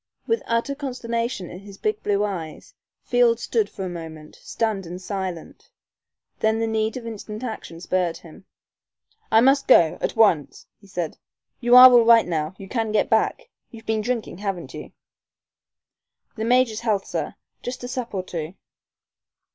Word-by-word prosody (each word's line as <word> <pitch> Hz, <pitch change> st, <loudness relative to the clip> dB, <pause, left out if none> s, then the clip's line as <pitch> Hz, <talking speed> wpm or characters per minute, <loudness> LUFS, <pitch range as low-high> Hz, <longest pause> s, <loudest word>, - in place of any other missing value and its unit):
With 455 Hz, 0 st, 0 dB
utter 230 Hz, +4 st, 0 dB
consternation 235 Hz, -, -4 dB
in 180 Hz, -, -9 dB
his 200 Hz, 0 st, -13 dB
big 430 Hz, 0 st, -2 dB
blue 205 Hz, 0 st, +1 dB
eyes, 175 Hz, -7 st, -5 dB, 0.3 s
Field 240 Hz, -2 st, +3 dB
stood 220 Hz, -3 st, 0 dB
for 190 Hz, -, -6 dB
a -, -, -4 dB
moment, 160 Hz, -3 st, -9 dB
stunned 210 Hz, -5 st, -3 dB
and 175 Hz, +2 st, -7 dB
silent. 185 Hz, -3 st, -6 dB, 0.7 s
Then 220 Hz, 0 st, +2 dB
the 225 Hz, -, 0 dB
need 220 Hz, +1 st, -1 dB
of 240 Hz, -, -8 dB
instant 215 Hz, 0 st, -7 dB
action 220 Hz, -8 st, -6 dB
spurred 180 Hz, -1 st, -1 dB
him. 170 Hz, +2 st, -15 dB, 0.9 s
"I 220 Hz, -, +6 dB
must 270 Hz, +2 st, +3 dB
go 170 Hz, -11 st, +5 dB
at -, -, -2 dB
once," 175 Hz, -10 st, +2 dB
he 200 Hz, -, -19 dB
said. 175 Hz, -5 st, -4 dB, 0.4 s
"You 240 Hz, 0 st, +4 dB
are 255 Hz, 0 st, +11 dB
all 240 Hz, -1 st, +7 dB
right 230 Hz, 0 st, +6 dB
now 160 Hz, 0 st, -2 dB
You 195 Hz, -, -10 dB
can 225 Hz, 0 st, -2 dB
get 215 Hz, -, +1 dB
back? 220 Hz, -, +1 dB, 0.2 s
You've 225 Hz, -2 st, -13 dB
been 220 Hz, -1 st, 0 dB
drinking, 230 Hz, -5 st, -3 dB
haven't 195 Hz, -4 st, -4 dB
you?" -, -, -9 dB, 1.4 s
"The 220 Hz, -, -3 dB
major's 245 Hz, -2 st, +3 dB
health, 215 Hz, -4 st, 0 dB
sir -, -, -4 dB, 0.3 s
just 245 Hz, 0 st, -6 dB
a -, -, -4 dB
sup 250 Hz, -4 st, -5 dB
or 185 Hz, -, -2 dB
two." 170 Hz, -1 st, -6 dB
220 Hz, 165 wpm, -23 LUFS, 185-235 Hz, 1.4 s, are